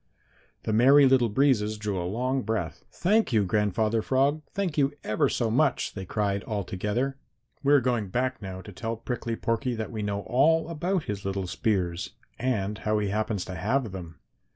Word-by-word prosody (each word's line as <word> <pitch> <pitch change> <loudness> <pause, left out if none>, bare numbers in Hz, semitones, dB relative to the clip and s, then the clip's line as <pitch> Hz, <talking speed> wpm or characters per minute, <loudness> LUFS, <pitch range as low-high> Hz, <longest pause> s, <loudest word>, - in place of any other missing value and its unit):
The 110 - -1
Merry 135 +6 +7
Little 130 -3 +4
Breezes 110 -3 +2
drew 105 -3 -2
a 90 - -3
long 130 +5 0
breath. 105 -9 -3
"Thank 210 +4 +2
you, 110 -4 +3
Grandfather 105 +3 +1
Frog, 140 +6 +1
thank 190 -6 -2
you 140 -1 +2
ever 105 - +1
so 115 -3 0
much!" 140 +2 +1
they 95 -2 -6
cried 100 0 -1
all 105 -3 -2
together. 105 +10 -2 0.4
"We 140 - +2
are 145 - +6
going 120 -4 0
back 130 +6 -1
now 95 -1 -6
to 105 - -11
tell 115 +4 -4
Prickly 115 0 -3
Porky 115 +2 -1
that 110 +1 -4
we 110 -2 -4
know 100 -1 -2
all 155 - +2
about 175 +2 -1
his 100 -1 -4
little 95 -1 -2
spears 90 -2 -1 0.3
and 105 -5 -1
how 110 0 0
he 105 -1 0
happens 105 -2 -1
to 95 - -6
have 110 +6 0
them." 85 -3 -8
110 Hz, 185 wpm, -27 LUFS, 100-130 Hz, 0.4 s, Merry